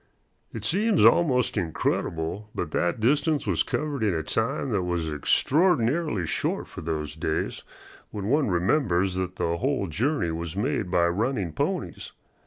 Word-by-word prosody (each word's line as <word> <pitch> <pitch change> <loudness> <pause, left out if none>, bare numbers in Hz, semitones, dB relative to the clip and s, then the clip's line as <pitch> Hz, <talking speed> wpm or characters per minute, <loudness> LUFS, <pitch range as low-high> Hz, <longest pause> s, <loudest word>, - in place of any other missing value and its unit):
It 110 -2 -5
seems 200 - +3
almost 130 -8 +4
incredible, 80 +3 -2
but - - -3
that 85 +4 0
distance 145 +6 +2
was - - +1
covered 150 -4 -2
in 105 -5 +1
a 80 - -1
time 125 +4 -1
that 100 -4 +1
was 85 -3 -2
extraordinarily 145 - +2
short - - -2
for - - -9
those 75 -2 -3
days, 80 0 -2 0.5
when 100 -2 -5
one 140 +6 +2
remembers 95 - +1
that 90 0 -3
the 85 -1 -1
whole 130 -3 0
journey 100 - 0
was 85 +1 -5
made 100 -1 -1
by 90 -1 +3
running 100 - -1
ponies. - - -3
100 Hz, 150 wpm, -26 LUFS, 85-140 Hz, 0.5 s, almost